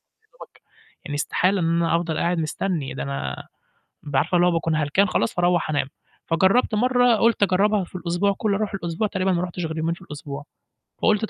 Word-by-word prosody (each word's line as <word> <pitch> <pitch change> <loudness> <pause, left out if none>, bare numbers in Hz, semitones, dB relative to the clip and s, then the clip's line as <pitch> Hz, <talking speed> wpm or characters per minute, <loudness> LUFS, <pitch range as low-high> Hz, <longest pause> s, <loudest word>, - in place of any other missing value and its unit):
يدوبك 445 +3 -18 0.4
يعني 145 - -5
استحالة 185 +6 +1
إن 165 - +1 0.2
أنا 165 0 +2
أفضل 165 -2 -2
قاعد 175 0 0
مستني، 160 -2 -2
ده 70 - -4
أنا 70 -1 -4 0.6
بابقى 145 -2 -1
عارفة 175 +3 0
اللي 175 0 +4
هو - - +3
باكون 165 -1 0
هلكان 155 +7 +2
خلاص 115 -10 0
فاروّح 175 -2 +1
أنام، 145 -2 0 0.4
فجرّبت 190 +8 +3
مرّه 245 +1 +3
قُلت 230 -1 +2
أجرّبها 200 +1 +3
في - - -19
الأسبوع 180 +3 0
كُلّه 205 -3 +1
أرُوح 210 -1 -2
الأسبوع 175 +2 -2
تقريبًا 190 -1 0
ما 175 0 0
رُحتش 175 -1 -3
غير 160 0 -5
يومين 165 +1 0
في - - -16
الأسبوع، 145 -1 -8 0.6
فقُلت 215 0 +3
ط - - -13
175 Hz, 195 wpm, -23 LUFS, 160-200 Hz, 0.6 s, اللي